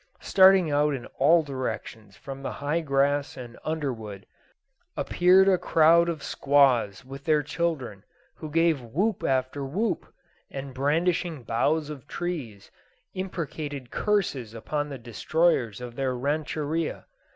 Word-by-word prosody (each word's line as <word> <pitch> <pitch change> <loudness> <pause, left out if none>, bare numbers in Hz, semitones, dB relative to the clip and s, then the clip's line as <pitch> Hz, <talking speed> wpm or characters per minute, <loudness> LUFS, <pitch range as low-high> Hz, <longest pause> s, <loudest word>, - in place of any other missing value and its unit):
Starting 190 -4 +5
out 145 0 +2
in 125 -2 -7
all 160 +5 +5
directions 125 -6 -6
from 135 0 -8
the 135 - -4
high 150 +4 -1
grass 140 -1 0
and 120 -2 -9
underwood, 115 -10 -4 0.7
appeared 185 +2 +4
a 185 -2 +4
crowd 165 +2 +4
of 160 -4 -4
squaws 130 -8 +2
with 135 +1 -9
their 155 -2 +3
children, 145 - -3 0.3
who 155 - -7
gave 165 -2 +2
whoop 175 - -1
after 130 +1 0
whoop, 180 +7 -2 0.4
and, 135 -1 -7
brandishing 160 +2 0
boughs 145 +7 0
of 140 -2 -10
trees, 140 - -5 0.4
imprecated 155 -7 -5
curses 145 - -1
upon 145 +6 -3
the 140 - -6
destroyers 120 +1 0
of 120 -1 -8
their 130 -1 -1
rancheria. 150 +3 -2
145 Hz, 130 wpm, -26 LUFS, 130-165 Hz, 0.7 s, Starting